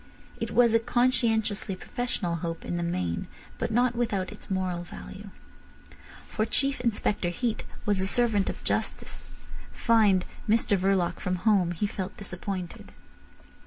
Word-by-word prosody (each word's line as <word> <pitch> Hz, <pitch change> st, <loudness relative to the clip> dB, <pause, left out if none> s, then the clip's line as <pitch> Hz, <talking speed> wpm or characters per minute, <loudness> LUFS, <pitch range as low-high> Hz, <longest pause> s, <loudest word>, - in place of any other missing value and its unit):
It -, -, -2 dB
was 235 Hz, -2 st, +5 dB
a 230 Hz, -, +6 dB
conscientiously 225 Hz, -4 st, +1 dB
professional 185 Hz, -4 st, -2 dB
hope 165 Hz, 0 st, -4 dB
in -, -, -2 dB
the 175 Hz, -, -1 dB
main, 90 Hz, -, -1 dB, 0.3 s
but -, -, 0 dB
not 240 Hz, +2 st, +3 dB
without 205 Hz, -6 st, 0 dB
its -, -, -10 dB
moral 185 Hz, -2 st, -1 dB
value. 190 Hz, +3 st, -9 dB, 1.0 s
For 215 Hz, -, -1 dB
Chief 275 Hz, +5 st, +1 dB
Inspector 210 Hz, -5 st, +1 dB
Heat 225 Hz, +6 st, -2 dB, 0.2 s
was 205 Hz, -2 st, +2 dB
a 190 Hz, -, +2 dB
servant 220 Hz, -3 st, +2 dB
of -, -, -6 dB
justice. -, -, -2 dB, 0.4 s
Finding 215 Hz, -6 st, +4 dB, 0.2 s
Mr 220 Hz, -1 st, +4 dB
Verloc 190 Hz, -2 st, +1 dB
from 185 Hz, -1 st, -1 dB
home, 200 Hz, -6 st, +4 dB
he 175 Hz, +5 st, -1 dB
felt 195 Hz, -1 st, -4 dB
disappointed. 185 Hz, -2 st, -5 dB
200 Hz, 140 wpm, -28 LUFS, 180-230 Hz, 1.0 s, a